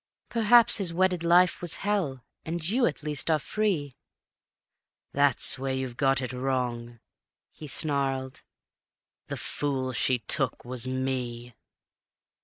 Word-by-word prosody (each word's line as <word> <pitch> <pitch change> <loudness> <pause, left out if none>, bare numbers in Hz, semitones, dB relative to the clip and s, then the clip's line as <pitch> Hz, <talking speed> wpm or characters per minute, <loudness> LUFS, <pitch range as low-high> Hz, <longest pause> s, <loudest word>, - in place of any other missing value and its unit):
Perhaps 230 +1 +5
his 190 -5 0
wedded 180 0 +1
life 175 +1 +4
was 175 -2 0
hell; 165 - -1 0.2
and 165 0 -3
you, 240 +6 +2
at 150 - -5
least, 150 +1 -2
are 160 - +4
free.. 155 -6 -2 0.5
." - - -58
"That's 140 -2 +3
where 135 0 -2
you've 130 -2 -4
got 135 0 +1
it 130 0 -4
wrong," 125 -2 -3 0.5
he 155 - -11
snarled; 135 -3 -1 0.9
"the - - -5
fool 135 -3 -2
she 125 +1 +3
took 125 +2 -1
was 125 0 -2
me. 125 -2 -4
135 Hz, 130 wpm, -27 LUFS, 130-170 Hz, 0.9 s, Perhaps